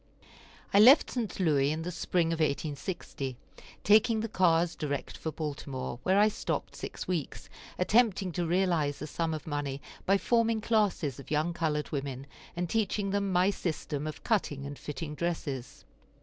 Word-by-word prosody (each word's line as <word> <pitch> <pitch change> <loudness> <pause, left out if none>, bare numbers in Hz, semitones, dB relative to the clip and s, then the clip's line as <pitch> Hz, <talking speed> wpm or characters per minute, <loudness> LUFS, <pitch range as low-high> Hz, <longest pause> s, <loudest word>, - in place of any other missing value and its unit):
I 200 - +6
left 260 +8 +8
St. 230 -7 -3
Louis 145 -5 +3
in 160 +1 -3
the 180 - -3
spring 170 0 0
of 165 - -3
1860, 145 -3 -2 0.5
taking 220 +2 +5
the 225 - -2
cars 175 -4 +3
direct 145 -3 -3
for 160 - -4
Baltimore, 140 -5 -5
where 190 +1 +2
I 210 +1 +6
stopped 215 - -3
six - - -6
weeks, 170 -6 -3 0.3
attempting 200 -1 +3
to 170 0 -2
realize 170 -5 +1
a - - -3
sum 165 +2 -2
of 155 +2 -4
money 145 -3 -3 0.3
by 195 +1 +5
forming 230 +1 +2
classes 205 - +1
of 140 - -11
young 155 +3 +1
colored 155 -3 -1
women, 135 -2 -4 0.3
and 175 0 -1
teaching 205 0 0
them 200 -1 0
my 185 +2 +4
system 155 -5 -3
of 155 - -7
cutting 150 - 0
and 140 0 -7
fitting 150 +1 -5
dresses. 150 -5 -4
165 Hz, 165 wpm, -30 LUFS, 145-195 Hz, 0.5 s, left